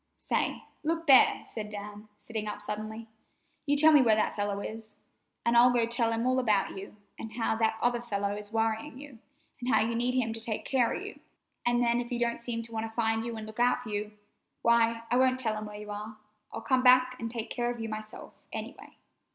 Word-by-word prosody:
"Say, - - -1 0.2
look 330 +1 -1
here!" 270 -2 +7
said 210 -2 -6
Dan, 210 0 -8
sitting 220 -2 -5
up 210 - -4
suddenly. 215 +2 -5 0.6
"You 290 +1 +3
tell 310 +2 +7
me 295 - +7
where 225 -4 +4
that 215 - 0
fellow 205 -1 -1
is, 220 +1 -6 0.5
an' 235 0 +2
I'll 245 +1 +7
go 240 -1 +2
tell 235 0 +1
him 230 +1 -1
all 255 0 +2
about 215 -6 +1
you, 195 +2 -9 0.2
and 220 - -7
how 225 -2 0
that 220 0 +1
other 240 0 +2
fellow 200 -4 -2
is 205 0 -7
worrying 225 +4 -1
you, 275 -4 -11 0.4
and 245 +1 -2
how 220 - +4
you 225 +2 0
need 245 +2 0
him 230 -3 0
to 225 - -7
take 220 -1 -3
care 255 -3 +2
o' - - -2
you; - - -8 0.5
an' 240 0 +2
then 235 0 +2
if 240 - -7
he 245 - -2
don't 235 -1 -1
seem 235 -1 -3
to 230 - -9
want 225 0 -3
to - - -12
find 225 -1 +1
you 230 -1 -5
and 215 - -6
look 220 +1 -10
out 245 +1 +2
for 215 - -8
you, 210 0 -4 0.5
why, 230 0 +3
I 245 - +3
won't 255 0 +3
tell 225 -4 +1
him 215 0 -5
where 210 0 -9
you 210 0 -8
are. 210 +1 -7 0.3
I'll - - -6
come 260 -1 +2
back 255 0 +5
and 230 - -4
take 230 -1 -5
care 240 0 -1
of 240 -1 -4
you 225 - -3
myself, 215 0 -8 0.2
any - - -5
way. - - -15
230 Hz, 235 wpm, -29 LUFS, 215-245 Hz, 0.6 s, here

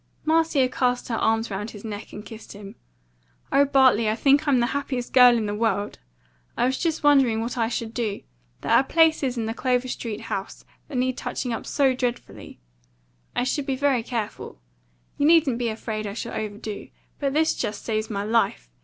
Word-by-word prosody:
Marcia 320 -4 +3
cast 250 -1 -1
her 230 - 0
arms 225 0 +1
round 205 +3 -4
his 210 -1 -11
neck 210 -1 -7
and 210 - -9
kissed 225 0 -10
him. 200 -1 -10 0.8
"O 280 +1 +5
Bartley, 260 -6 +4
I 215 - +1
think 280 +5 +3
I'm 270 -3 +4
the 240 - +2
happiest 265 -3 -3
girl 250 -2 +7
in 220 - -1
the 205 - -2
world! 210 -1 -1 0.6
I - - +2
was 260 +1 0
just 325 -3 -1
wondering 270 -6 +4
what 235 +2 -3
I 230 -2 +1
should 225 -1 -4
do. 220 -4 -2 0.4
There - - -3
are - - +6
places 315 -4 +2
in 225 - -1
that 225 +1 -4
Clover 255 -1 0
Street 230 -3 -5
house 195 -3 -5 0.2
that 280 - -5
need 255 0 0
touching 245 -2 -3
up - - -5
so 275 -3 +2
dreadfully. 250 - -5 0.8
I - - +1
shall 280 +3 -1
be 270 -1 -2
very 270 -2 +1
careful. 225 - -5 0.6
You 290 - +3
needn't 310 -7 +4
be 240 -1 0
afraid 220 -1 -4
I 200 - -5
shall 230 +2 -5
overdo. 210 0 -5 0.3
But, 275 -2 -1
this 315 +2 +2
just 210 - -4
saves 215 -1 -1
my 200 -2 -2
life. 205 - 0
240 Hz, 195 wpm, -24 LUFS, 220-270 Hz, 0.8 s, girl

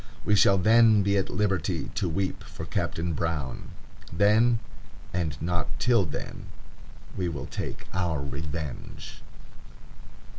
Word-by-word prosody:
We 105 - +3
shall 100 -1 +5
then 110 +1 +6
be 100 +1 +2
at 95 - 0
liberty 95 -3 -1
to - - -1
weep 95 +3 -2
for - - -8
Captain 85 +1 -2
Brown. 75 -4 -3 0.4
Then, 110 +6 +4 0.6
and 80 -5 -2
not 85 +1 -2
till 120 -6 +4
then, - - -6 0.7
we 90 -2 -1
will 75 -4 -5
take - - -5
our 85 -5 0
revenge. 75 +2 -6
90 Hz, 120 wpm, -27 LUFS, 80-100 Hz, 0.7 s, then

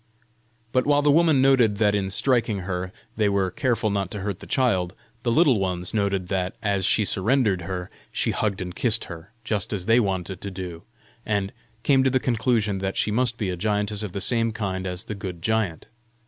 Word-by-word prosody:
But 130 +2 +1
while 145 0 +4
the 145 - +5
woman 155 -3 +4
noted 125 -6 +4
that 105 -1 +3
in 100 -2 0
striking 115 -2 +1
her 90 0 -3 0.3
they 105 -2 +3
were 100 -2 +1
careful 120 -7 0
not 100 -2 -1
to 105 - -5
hurt 100 -1 -3
the - - -11
child, 95 -9 +1 0.3
the 120 - 0
Little 140 -5 +4
Ones 90 -1 -2
noted 100 -4 0
that, 95 -2 -1
as 100 -3 +1
she 105 - +3
surrendered 105 -1 +2
her, 90 +1 -5 0.2
she - - 0
hugged 100 -3 -1
and 90 -1 -7
kissed 115 0 +1
her 85 +3 -10
just 110 -4 -1
as 95 -4 -3
they 115 +3 +5
wanted 95 -3 -2
to 100 - -5
do, 90 -3 -7 0.4
and 100 -2 -1 0.3
came 135 -2 +4
to 130 - +4
the 130 0 +2
conclusion 110 -5 +1
that 95 0 -3
she 105 - +1
must 115 +1 +1
be 100 -4 -1
a - - -2
giantess 105 +2 -1
of 105 -4 -5
the 100 - -3
same 115 +1 +1
kind 95 -4 -3
as 90 0 -3
the - - -4
good 95 -5 -7
giant. 110 -6 0
100 Hz, 205 wpm, -24 LUFS, 95-115 Hz, 0.4 s, the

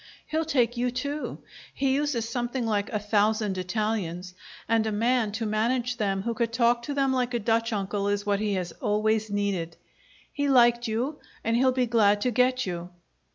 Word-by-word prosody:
He'll 315 +2 -1
take 245 -6 +1
you, 250 +1 +1
too. 280 +4 -4 0.3
He 270 -1 +1
uses 275 -5 0
something 240 +1 -2
like 205 -2 0
a 215 - -1
thousand 210 -1 +1
Italians, 185 -2 -2 0.3
and 225 -1 +2
a - - -1
man 230 +1 +1
to 225 +1 -2
manage 235 +3 0
them 195 -3 -1
who 235 - -1
can 235 +1 0
talk 235 0 +2
to 285 - -4
them 270 -1 +2
like 250 -1 0
a - - +1
Dutch 230 +1 +1
uncle 200 -1 -2
is 205 0 -1
what 200 -1 +1
he 210 -1 0
has 180 -2 -3
always 215 +1 +1
needed. 200 -5 -2 0.6
He 285 0 0
liked 240 -2 +4
you, 245 +7 -2 0.2
and 230 +1 +1
he'll 260 +2 +4
be 255 0 +1
glad 210 -3 +3
to 250 - +1
get 255 +1 +2
you." 175 -1 -5
230 Hz, 190 wpm, -26 LUFS, 205-250 Hz, 0.6 s, liked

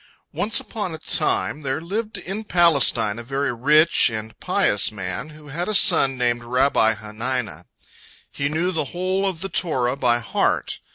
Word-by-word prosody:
Once 215 - 0
upon 205 -7 -5
a - - -8
time 155 -1 0
there 135 0 -2
lived 210 +6 -4
in 195 +4 -6
Palestine 140 - +2
a - - -8
very 135 +1 -2
rich 150 +7 +4
and 110 0 -6
pious - - +2
man, 95 +7 -5
who 150 -1 -14
had 170 +5 -4
a 215 - -1
son 140 -8 +5
named 120 -1 0
Rabbi 120 -2 +2
Hanina. 110 -2 -5 0.7
He 140 0 -2
knew 170 +4 -1
the 160 -4 -2
whole 190 +2 0
of 170 -3 -7
the 195 - -3
Torah 135 -8 -1
by 120 -3 +2
heart. 120 -3 -1
140 Hz, 165 wpm, -22 LUFS, 120-175 Hz, 0.7 s, son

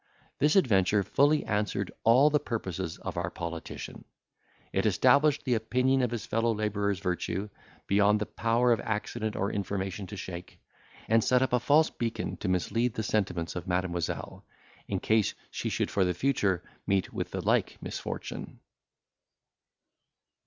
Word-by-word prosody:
This 150 +1 +3
adventure 105 - +4
fully 145 +8 +3
answered 105 -2 -1
all 130 +6 +6
the 150 - +3
purposes 95 - -4
of - - -6
our - - -1
politician; 85 -1 -6 0.7
it - - +2
established 150 +1 +4
the 130 - +2
opinion 125 +4 +2
of 125 - +1
his 120 -2 -4
fellow 115 +1 +1
labourer's 105 -2 0
virtue, 95 +2 -2 0.3
beyond 105 +1 +3
the 105 - -1
power 115 +3 +1
of 115 - +3
accident 110 0 -3
or 100 +2 -1
information 95 -1 -3
to 105 - -8
shake, 90 -2 -8 0.5
and 115 0 +4
set 125 0 +3
up 130 - -1
a 125 - +4
false 150 +6 +4
beacon 115 -1 -3
to - - -4
mislead 115 +6 0
the 110 - -2
sentiments 95 -6 -1
of 90 0 -5
Mademoiselle, 90 -1 -2 0.4
in - - -1
case 110 -2 +2 0.2
she - - -3
should - - -1
for 95 - +2
the 90 -1 0
future 100 -7 +1 0.2
meet 95 -1 +1
with - - -3
the - - -4
like - - +1
misfortune. - - -6
105 Hz, 150 wpm, -29 LUFS, 95-120 Hz, 0.7 s, all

